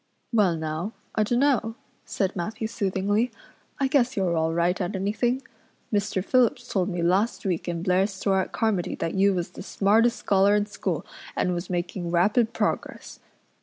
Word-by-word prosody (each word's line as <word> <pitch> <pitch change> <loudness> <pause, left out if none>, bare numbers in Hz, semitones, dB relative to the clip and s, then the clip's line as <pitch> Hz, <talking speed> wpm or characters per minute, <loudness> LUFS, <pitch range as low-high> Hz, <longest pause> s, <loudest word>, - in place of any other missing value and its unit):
"Well 200 -6 +3
now, 160 +6 -3 0.2
I - - +1
dunno," 240 0 +2 0.3
said 195 -1 -1
Matthew 205 +5 -3
soothingly. 205 +2 0 0.5
"I 275 - +2
guess 265 -3 +2
you're 180 -3 +1
all 160 0 +1
right 170 +3 +1
at 185 +3 -2
anything. 225 +7 0 0.5
Mr. 200 -2 0
Phillips 250 +1 +2
told 190 -4 0
me 175 -2 -2
last 195 +8 +1
week 180 -3 -1
in 170 -1 -3
Blair's 190 +2 +2
store 195 0 0
at - - -5
Carmody 215 -6 0
that 165 - -3
you 195 0 +3
was 175 -1 -2
the - - -9
smartest 225 +4 +2
scholar 200 +1 +3
in 205 0 +2
school 205 - -3 0.3
and 180 - +1
was 175 +1 -4
making 175 0 -3
rapid 210 +7 +3
progress. - - -3
195 Hz, 165 wpm, -25 LUFS, 180-220 Hz, 0.5 s, Well